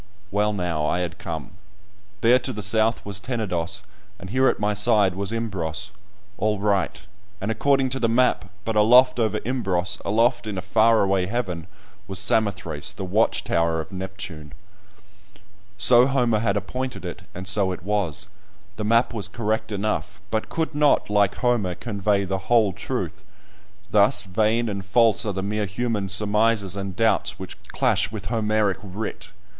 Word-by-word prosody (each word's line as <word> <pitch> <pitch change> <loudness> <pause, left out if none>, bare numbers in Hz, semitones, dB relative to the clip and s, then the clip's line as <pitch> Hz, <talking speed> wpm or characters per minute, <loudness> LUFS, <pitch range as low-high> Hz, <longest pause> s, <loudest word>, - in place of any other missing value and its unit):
Well, 105 +1 +1
now 85 -6 -1
I 90 - 0
had 85 -1 -4
come; 80 -3 -6 0.7
there 120 +2 +5
to 130 +1 -4
the 105 -4 -6
south 110 +3 +1
was 100 -1 -3
Tenedos, 100 -6 -3 0.3
and 95 0 -9
here 130 +2 +3
at - - +1
my 105 0 +1
side 105 -3 +3
was 100 +2 -2
Imbros, 95 -5 -2 0.5
all 105 -1 +1
right, 100 -2 0 0.4
and 100 +3 -2
according 135 +3 +2
to 135 +1 -3
the 115 - +1
map, 125 -2 +2 0.2
but 110 - -2
aloft 125 +4 +6
over 110 -3 +1
Imbros, 95 -8 -1
aloft 115 +3 +1
in 105 -3 -4
a - - -2
far 115 +2 +4
away 95 -2 +1
heaven, 90 -7 -3 0.4
was 95 -1 -4
Samothrace, 100 +1 0
the 95 - -5
watch 105 +5 +1
tower 85 -1 +1
of 80 +5 -6
Neptune! 95 -6 -7 1.2
So 120 +5 +6
Homer 125 -5 +2
had 105 -2 +1
appointed 125 +6 -4
it, - - -6
and 95 +1 -5
so 100 -2 +1
it 90 - -6
was; 100 -2 0 0.5
the 105 - -3
map 115 +3 +3
was 105 -4 -3
correct 110 +1 -2
enough, 105 +1 -2
but 110 -1 -1
could 160 -1 -2
not, 145 -7 +2
like 100 -1 +3
Homer, 115 -8 0
convey 100 -1 0
the 95 0 -4
whole 110 -5 +4
truth. - - -4 0.7
Thus - - +4
vain 110 +4 +1
and 100 -2 -3
false 110 +2 +3
are 105 - -1
the 95 0 -3
mere 105 +1 -1
human 105 -1 -2
surmises 105 -1 +1
and 95 -2 -5
doubts 115 +2 +1
which - - -8
clash - - +1
with 100 -4 -6
Homeric 110 -4 +1
writ! 105 +2 -6
105 Hz, 165 wpm, -24 LUFS, 95-115 Hz, 1.2 s, aloft